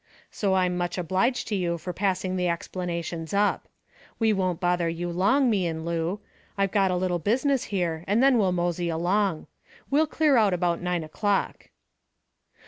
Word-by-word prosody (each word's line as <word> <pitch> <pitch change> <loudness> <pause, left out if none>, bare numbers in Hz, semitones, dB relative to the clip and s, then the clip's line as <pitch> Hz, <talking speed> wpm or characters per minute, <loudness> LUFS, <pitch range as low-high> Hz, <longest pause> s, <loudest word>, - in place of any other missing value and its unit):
So 195 -3 0
I'm 180 -1 +1
much 175 +1 -2
obliged 190 +8 0
to 210 - 0
you 175 -3 -1
for 180 +2 -6
passing 185 0 -1
the 180 -1 0
explanations 170 0 -4
up. 205 +1 +1 0.5
We 220 -2 +2
won't 185 -3 -1
bother 175 -2 +1
you 175 +1 -3
long, 250 +11 +3
me 200 -6 +1
and 160 -1 -4
Lou. 170 +4 -2 0.4
I 195 - +3
got 195 -1 +1
a 180 - 0
little 180 -1 0
business 260 - +1
here, 170 -5 -2
and 205 +3 +2
then 270 -3 +5
we'll 190 -3 +2
mosey 175 -1 -1
along. 175 +1 0 0.5
We'll 305 +3 +3
clear 300 -3 +2
out 205 -5 +3
about 175 -1 0
nine 180 -2 -1
o'clock." 200 +6 -2
185 Hz, 170 wpm, -26 LUFS, 175-205 Hz, 0.5 s, then